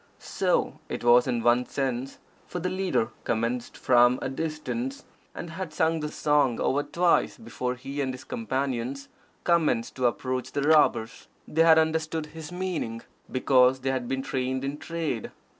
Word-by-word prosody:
So - - -1
it - - -4
was 120 +1 +6
in 120 -3 -1
one 120 +1 +3
sense; 135 -1 -3 0.3
for - - -5
the 180 +1 -2
leader 185 -11 0
commenced 115 +2 -2
from 120 0 +4
a - - -3
distance, 165 - -4 0.3
and 170 - -6
had 175 -1 -5
sung 160 -1 +2
the 150 0 -3
song 145 -5 +2
over 145 - +1
twice 175 +3 +1
before 125 - -4
he 135 +3 -5
and 130 -1 -1
his 130 0 -9
companions 135 - -3 0.3
commenced 160 -9 +2
to 125 -1 +3
approach 130 +1 -3
the 140 - 0
robbers. 145 -7 +3 0.2
They 160 - +1
had 165 -1 +7
understood 160 0 +1
his 160 0 -8
meaning, 180 -11 -3 0.3
because 130 0 +4
they 135 +1 0
had 130 -2 -2
been 135 +1 -2
trained 130 0 -2
in 140 +2 -3
trade. 160 -9 -3
135 Hz, 160 wpm, -27 LUFS, 125-160 Hz, 0.3 s, had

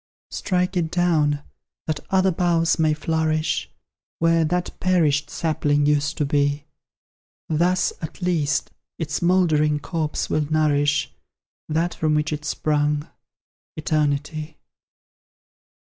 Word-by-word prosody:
Strike 180 0 -1
it 170 -3 0
down, 155 -5 +1 0.4
that 155 -2 -2
other 190 0 +3
boughs 170 -2 +1
may 155 -1 +3
flourish 155 0 0 0.5
Where 165 0 +3
that 180 +3 -1
perished 160 -6 +2
sapling 145 -3 0
used 150 +1 +1
to 150 - +1
be; 145 0 0 0.8
Thus, 175 +4 +1
at 160 - -7
least, 160 -5 0 0.3
its 155 -2 -3
mouldering 160 -4 +3
corpse 155 +1 -2
will 150 0 -1
nourish 150 -1 +2 0.6
That 165 +3 0
from 155 -1 0
which 150 0 0
it 150 0 -5
sprung 150 0 0 0.7
Eternity. 155 0 -1
155 Hz, 110 wpm, -23 LUFS, 150-170 Hz, 0.8 s, other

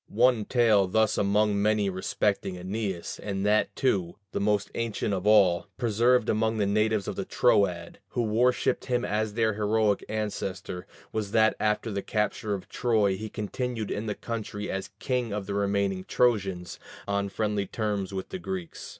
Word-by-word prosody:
One 120 -1 +3
tale 110 -6 +4
thus 110 +3 +2
among 105 0 +2
many 105 -1 +2
respecting 95 +1 -1
Æneas, 95 0 -4
and 100 -1 -3
that, 105 +1 +2
too, 95 -10 0 0.2
the - - -2
most 105 0 +1
ancient 115 -3 -2
of 95 +1 -2
all, 100 -4 +5
preserved 120 +1 +3
among 110 +1 +1
natives 105 0 +1
of - - -3
the - - -2
Troad, 90 -4 +1
who 120 - -1
worshipped 120 +3 +1
him 125 -1 0
as 105 0 -1
their 110 -2 +2
heroic 105 0 +1
ancestor, 100 -4 -4 0.2
was 105 -2 -3
that 110 -1 +4
after 110 +1 0
the 100 -1 -2
capture 105 -1 -1
of 95 - -8
Troy 110 -5 +1
he 110 +3 -6
continued 115 +1 -3
in 110 +2 -3
the 105 - -2
country 110 -3 -5
as 95 0 -4
king 125 -1 -1
of 100 -1 -3
the 100 - -4
remaining 100 -1 0
Trojans, 95 -7 0 0.3
on 100 0 0
friendly 105 0 -1
terms 105 -3 -2
with 95 -1 -5
the 190 - -5
Greeks. 180 -2 -6
105 Hz, 165 wpm, -27 LUFS, 100-110 Hz, 0.3 s, all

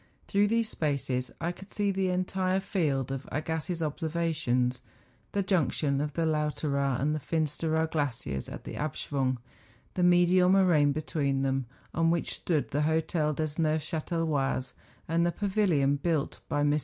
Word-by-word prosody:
Tlirough 205 0 +3
these 230 0 +2
spaces 135 -4 -1
I 170 +1 -1
could 190 +3 -12
see 205 -1 +1
the 190 -1 0
entire 185 +1 0
field 150 - -1
of 135 0 -5
Agassiz's 160 +3 -2
obser¬ 155 +1 -2
vations; 150 -7 0 0.5
the 200 - +1
junction 150 -6 +1
of 150 -1 -2
the 165 +1 0
Lauteraar 150 -4 0
and 150 +3 +1
Fins¬ 155 0 -1
teraar 160 0 +1
glaciers 120 - -2
at - - -8
the - - -7
Abschwung, 135 -3 -1 0.6
the 180 - -1
medial 180 +1 +5
moraine 175 -7 +5
between 140 -2 -1
them, 135 -2 0 0.3
on 165 0 +2
which 170 0 0
stood 155 -5 -1
the 145 - +1
Hotel 160 0 +1
des 155 +2 -2
Neuf 155 -1 +1
chatelois, 155 -5 -1 0.3
and 165 +2 +2
the 175 - +2
pavilion 180 -9 +2
built 155 -1 -1
by 145 0 +1
]\r. 145 +1 +3
155 Hz, 155 wpm, -29 LUFS, 140-175 Hz, 0.6 s, medial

